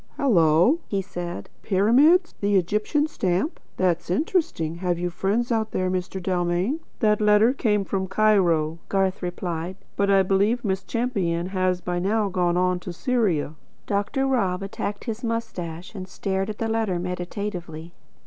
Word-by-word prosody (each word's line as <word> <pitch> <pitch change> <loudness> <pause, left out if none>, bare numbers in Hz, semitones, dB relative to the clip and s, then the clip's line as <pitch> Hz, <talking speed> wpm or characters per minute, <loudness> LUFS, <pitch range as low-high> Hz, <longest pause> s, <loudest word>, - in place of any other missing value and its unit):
"Hello!" 185 - +4
he 200 - -1
said. 175 -2 -6
"Pyramids? 260 - +4
The 205 0 +2
Egyptian 210 - +1
stamp? 195 - -1 0.2
That's 175 -2 0
interesting. 180 - 0
Have 175 -1 -1
you 175 0 -2
friends 205 +7 0
out 220 -1 +1
there, 185 0 0
Mr. 185 +1 -3
Dalmain?" 180 - 0 0.2
"That 210 -1 +3
letter 210 +3 +5
came 210 -7 +1
from 190 -1 -2
Cairo," 180 -6 +2
Garth 195 -1 0
replied; 175 -1 -4 0.2
"but 200 0 +1
I 195 -1 +5
believe 200 +6 +1
Miss 190 -1 0
Champion 190 -8 -1
has 185 -2 0
by 175 0 -2
now 205 +3 +1
gone 180 -2 +1
on 180 0 +1
to 180 - -7
Syria." 190 - 0 0.3
Dr. 205 +7 0
Rob 195 -9 0
attacked 205 +1 -4
his 230 0 -5
moustache, 190 -7 -4
and 185 -3 -7
stared 190 +1 -2
at 210 - -5
the 225 - -2
letter 220 -5 0
meditatively. 175 -2 -5
190 Hz, 150 wpm, -24 LUFS, 180-215 Hz, 0.3 s, letter